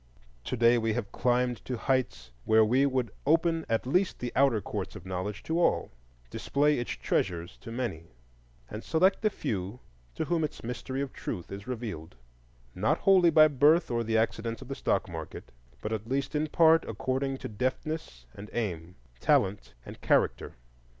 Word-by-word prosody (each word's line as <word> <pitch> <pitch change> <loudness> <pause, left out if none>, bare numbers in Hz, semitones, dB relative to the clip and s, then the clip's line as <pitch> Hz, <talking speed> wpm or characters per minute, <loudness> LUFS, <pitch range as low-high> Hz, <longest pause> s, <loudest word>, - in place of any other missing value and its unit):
To 125 - -3
day 120 +1 +5
we 115 -1 0
have 105 -3 -4
climbed 125 -1 0
to 125 - -3
heights 130 - -1
where 110 0 +5
we 130 +5 +3
would 130 -5 -1 0.2
open 165 +1 +2
at 115 +1 0
least 180 +9 +1
the 125 - -4
outer 135 -5 +4
courts 95 - -5
of - - -10
knowledge 95 +3 -4
to 165 +2 -1
all, 175 - +1 0.4
display 145 0 +1
its 120 - -4
treasures 85 -1 -2
to 115 - -10
many, 115 -10 -4 0.6
and 105 +1 -7
select 185 +4 +2
the 215 - +3
few 100 - -4 0.4
to - - -2
whom 170 -2 0
its 150 - -4
mystery 125 +3 -4
of 140 - -7
Truth 85 - -6
is 100 +2 -8
revealed, 110 -10 -6 0.6
not 135 - +1
wholly 185 -3 +5
by 155 -1 +7
birth 150 +2 +3
or 115 0 0
the 110 0 +1
accidents 115 0 -1
of - - -15
the - - -2
stock - - 0
market, - - -8 0.3
but 105 - -2
at 110 +1 -5
least 135 +1 -1
in 150 +1 0
part 165 +1 +5
according 130 +4 -2
to - - -6
deftness 125 - -4
and 105 +2 -10
aim, 90 -7 -3 0.2
talent 100 +8 +1
and - - -11
character. - - +1
120 Hz, 175 wpm, -29 LUFS, 105-145 Hz, 0.6 s, by